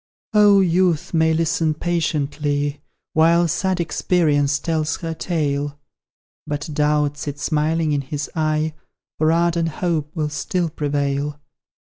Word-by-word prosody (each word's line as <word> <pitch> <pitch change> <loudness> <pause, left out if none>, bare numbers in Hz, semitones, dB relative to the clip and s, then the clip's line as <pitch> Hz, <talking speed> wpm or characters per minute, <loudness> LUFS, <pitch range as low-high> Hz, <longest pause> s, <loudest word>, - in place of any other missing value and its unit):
Oh, 205 -2 +6
Youth 175 -3 +1
may 160 -1 +3
listen 160 -1 +1
patiently, 145 -3 -1 0.3
While 170 +2 +4
sad 185 +3 0
Experience 150 -4 +1
tells 155 0 -1
her 165 -1 -3
tale, 145 -4 -2 0.7
But 150 0 -3
Doubt 150 -1 +1
sits 145 -1 -5
smiling 155 +1 +1
in 145 -1 +1
his 145 +2 -4
eye, 155 0 0 0.5
For 155 +1 +3
ardent 170 0 +1
Hope 160 -2 -2
will 155 -2 -1
still 170 +3 -1
prevail! 145 0 -2
155 Hz, 120 wpm, -21 LUFS, 145-165 Hz, 0.7 s, Oh